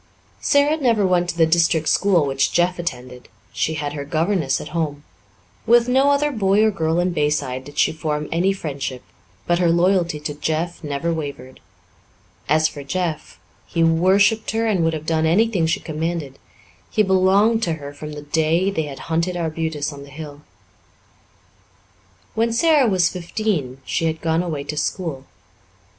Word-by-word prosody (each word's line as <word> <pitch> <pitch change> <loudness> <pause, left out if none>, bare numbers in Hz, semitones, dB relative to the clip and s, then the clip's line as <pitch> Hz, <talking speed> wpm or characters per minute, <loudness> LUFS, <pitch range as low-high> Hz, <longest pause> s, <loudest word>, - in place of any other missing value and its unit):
Sara 285 +2 +3
never 230 -8 +2
went 180 -1 +1
to 170 - -4
the 165 - +5
district 165 -1 +2
school 185 -6 +3
which 135 -1 0
Jeff 175 +1 +1
attended; 125 -6 -6 0.3
she 160 - -1
had 145 -1 -3
her 145 -1 -4
governess 160 -1 0
at 150 - -8
home. 150 -4 -3 0.6
With 235 +1 +5
no 265 +3 +3
other 290 +1 +2
boy 205 -3 +2
or 220 - +3
girl 160 -4 -1
in 180 +1 +1
Bayside 145 -4 -1
did 145 +1 -12
she - - +3
form 150 -1 -3
any 175 +4 +2
friendship, 140 -8 -5 0.4
but 175 0 +1
her 175 -2 +3
loyalty 170 -2 +2
to 150 0 -4
Jeff 160 +4 -3
never 150 +3 -2
wavered. 140 -5 -6 0.9
As 155 +1 +4
for 145 -2 -8
Jeff, 165 +1 -4 0.3
he 165 - 0
worshipped 190 +6 +3
her 225 +1 0
and 200 -6 +1
would 165 0 +1
have 155 -1 -5
done 160 0 +1
anything 190 -1 +2
she 160 - 0
commanded. 155 -3 -4 0.5
He 215 - +2
belonged 195 +4 +3
to 170 -6 0
her 145 -2 -8
from 150 +1 -8
the 150 0 -8
day 160 +5 +1
they 160 -5 -2
had 140 -2 -8
hunted 170 +2 -1
arbutus 160 -3 -2
on 140 - -10
the 140 - -12
hill. 145 0 -9 1.9
When 230 +1 +1
Sara 295 +1 +4
was 185 -4 +3
fifteen 170 - -3
she 165 - -1
had 160 0 -1
gone 165 +1 0
away 160 -5 -3
to 150 +1 -6
school. 150 -4 -3
165 Hz, 170 wpm, -21 LUFS, 150-190 Hz, 1.9 s, the